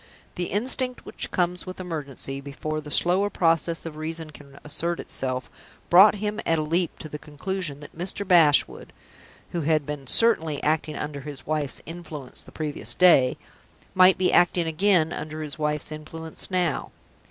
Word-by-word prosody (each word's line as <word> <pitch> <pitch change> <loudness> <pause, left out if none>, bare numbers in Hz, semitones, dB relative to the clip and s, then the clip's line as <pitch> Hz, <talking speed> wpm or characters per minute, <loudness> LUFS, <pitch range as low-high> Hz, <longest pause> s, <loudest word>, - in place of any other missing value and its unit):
The 175 - -3
instinct 250 +6 0
which - - -3
comes 180 0 -1
with 185 - -7
emergency, 140 -6 -2
before 145 +3 -5
the 150 - -10
slower 185 +6 +2
process 165 -2 +1
of 155 -2 -7
reason 160 0 -5
can 140 -1 -14
assert 170 +3 -3
itself, 130 -1 -4 0.4
brought 195 +4 +8
him 210 +1 -3
at 165 - +1
a 155 - 0
leap 170 +3 -1
to - - -8
the 150 0 -7
conclusion 155 0 -5
that 145 - -12
Mr. 185 +4 -3
Bashwood 165 -6 +3 0.6
who 170 - -2
had 155 -1 +1
been 145 -2 -6
certainly 165 - +4
acting 155 0 0
under 145 -1 -5
his 140 -1 -8
wife's 150 -3 -2
influence 160 -5 -8
the - - -14
previous 150 -2 -3
day 165 -8 +5 0.6
might 185 0 +6
be 185 - +1
acting 175 -1 +3
again 170 0 +2
under 155 0 -5
his 150 0 -7
wife's 150 -1 -1
influence 160 +1 -4
now. 180 -5 -1
160 Hz, 165 wpm, -25 LUFS, 150-180 Hz, 0.6 s, brought